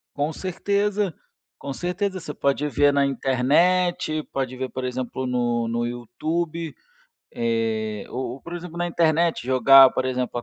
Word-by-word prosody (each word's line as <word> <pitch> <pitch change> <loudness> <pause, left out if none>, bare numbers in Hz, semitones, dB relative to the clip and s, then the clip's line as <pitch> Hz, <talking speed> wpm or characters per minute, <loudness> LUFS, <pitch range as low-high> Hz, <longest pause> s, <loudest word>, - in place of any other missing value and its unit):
Com 145 +2 -1
certeza, 200 +2 -1 0.5
com 140 - -6
certeza. 185 +4 -2
Você 160 -4 -7
pode 140 +1 0
ver 145 0 +3
na 140 - +3
internet, 155 +6 +1
pode 130 -2 -3
ver, 130 0 -4
por 130 - -5
exemplo, 130 +1 -3
no 120 -2 0
no 120 +1 -1
YouTube, 155 +7 -3 0.6
eh, 110 -2 -1
ou 125 -1 -4
ou, 135 - -13
por 170 - -10
exemplo, 175 -1 -8
na 175 - 0
internet, 165 -3 +1
jogar, 130 +1 +7
por - - -2
exemplo, 125 -1 -2
a - - -5
140 Hz, 155 wpm, -23 LUFS, 125-170 Hz, 0.6 s, jogar